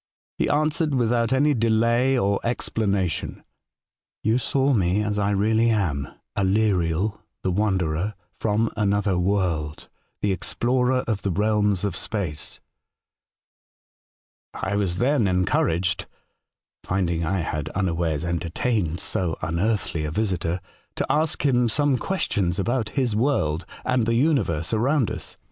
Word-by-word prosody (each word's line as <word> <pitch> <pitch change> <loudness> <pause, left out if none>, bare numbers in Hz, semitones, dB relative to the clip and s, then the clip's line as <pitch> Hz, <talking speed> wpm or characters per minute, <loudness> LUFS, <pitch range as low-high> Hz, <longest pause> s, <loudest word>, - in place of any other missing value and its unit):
He - - +1
answered, 155 0 +1
with 120 -2 +2
out 115 0 +1
any 145 +3 +3
delay 115 +2 +2
or 100 -4 +1
explanation: 100 -7 -1 0.4
' - - -71
You 110 +4 +2
saw 135 +2 +1
me 95 -1 +2
as 105 0 -1
I 100 0 +1
really 110 +3 +2
am, 80 - 0 0.3
Aleriel, 95 -1 +1 0.2
the 95 - +1
wanderer, 95 -1 0 0.2
from 110 +1 +1
another 100 -3 +1
world, 90 -5 -1 0.3
the 105 - +1
explorer 125 +7 +1
of 110 -4 -1
the 100 - -1
realms 105 0 +1
of 100 -4 -2
space.' 90 -9 -3 1.4
" - - -81
I 100 - -2
was 95 -4 0
then 125 0 +2
encouraged 90 -1 +1 0.8
(finding 85 -3 0
I 90 +3 0
had 75 -2 -3
un 95 0 +1
awares 85 -3 -1
entertained 85 +1 -1
so 90 -3 -1
unearthly 85 0 -1
a 75 - -2
visitor) 90 -1 -1 0.3
to - - -1
ask 155 +1 0
him 125 -3 +3
some 145 0 +2
questions 100 - -1
about 115 +3 0
his 125 -6 +1
world 100 - 0 0.2
and 125 -3 +1
the 115 - +2
universe 115 - +1
around 125 +3 +2
us. - - -3
105 Hz, 135 wpm, -24 LUFS, 90-120 Hz, 1.4 s, any